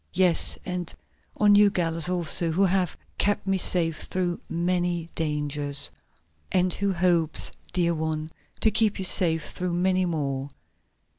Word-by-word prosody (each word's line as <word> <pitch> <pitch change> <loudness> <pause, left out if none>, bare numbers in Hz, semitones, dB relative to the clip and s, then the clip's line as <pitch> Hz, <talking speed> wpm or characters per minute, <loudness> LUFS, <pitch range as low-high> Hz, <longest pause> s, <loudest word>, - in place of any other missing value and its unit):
Yes, 180 -2 +2
and 180 -2 -4 0.5
on 210 -1 +5
you 205 0 +6
Gallus 165 -3 +1
also, 175 -1 +1
who 190 +4 +2
have 185 -3 0 0.2
kept 205 0 +1
me 195 -1 0
safe 165 -4 +1
through 180 -2 -2
so - - -25
many 175 0 -1
dangers." 145 -2 -2 0.6
"And 180 -1 +2
who 200 0 -1
hopes, 170 -3 +2 0.2
dear 170 -2 +1
one, 155 -1 -3 0.3
to 220 - +4
keep 215 -1 +3
you 190 - -2
safe 165 -3 +2
through 180 -1 -3
many 185 +1 +1
more. 140 -4 -3
175 Hz, 145 wpm, -25 LUFS, 160-185 Hz, 0.6 s, you